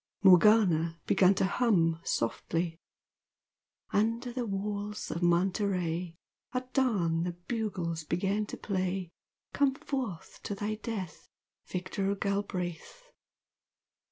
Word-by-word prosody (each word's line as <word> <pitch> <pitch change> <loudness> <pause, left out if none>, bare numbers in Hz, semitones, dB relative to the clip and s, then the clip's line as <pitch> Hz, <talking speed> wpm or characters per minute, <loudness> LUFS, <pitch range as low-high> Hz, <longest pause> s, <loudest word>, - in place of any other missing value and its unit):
Morgana 180 -4 +6
began 190 +1 +5
to 190 - +2
hum 190 -6 +2
softly 165 +8 -1 1.1
"Under 230 +4 +1
the 245 -2 -2
walls 205 +1 -3
of 170 - -3
Monterey 175 -1 +1 0.4
At 255 0 -3
dawn 180 -11 +2
the 175 0 -2
bugles 175 -4 -3
began 195 +6 0
to - - -6
play 185 -2 -2 0.4
Come 280 -1 +3
forth 250 - -5
to 205 - -4
thy 205 +2 -2
death 215 -7 -6 0.4
Victor 195 +2 -2
Galbraith." 200 - -3
195 Hz, 100 wpm, -30 LUFS, 175-215 Hz, 1.1 s, Morgana